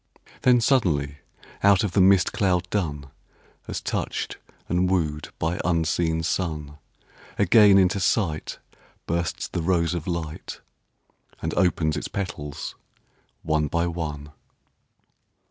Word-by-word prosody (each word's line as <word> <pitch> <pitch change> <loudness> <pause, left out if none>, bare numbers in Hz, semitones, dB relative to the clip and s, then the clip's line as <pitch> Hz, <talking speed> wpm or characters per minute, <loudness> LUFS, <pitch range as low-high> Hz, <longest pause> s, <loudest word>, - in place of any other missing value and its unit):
Then 125 -1 +5
suddenly 75 - +1 0.4
out 100 0 +5
of 105 - -1
the 95 - +3
mist 95 -1 +4
cloud 90 -3 +1
dun, 75 -8 -2 0.6
As - - -3
touched - - -3 0.3
and 90 +1 +1
wooed 75 -5 -1
by 80 +2 -1
unseen 80 -1 0
sun, 75 -4 -3 0.6
Again 100 0 +6
into 95 +1 +3
sight 90 -6 0 0.5
bursts 85 0 -2
the 85 - -3
rose 85 -1 +1
of 85 -4 -4
light 85 -3 -5 0.8
And - - -3
opens 80 -4 +1
its - - -3
petals 75 -7 -5 0.7
one 80 -1 +1
by 85 +3 0
one. 75 -4 -4
85 Hz, 115 wpm, -24 LUFS, 80-95 Hz, 0.8 s, Again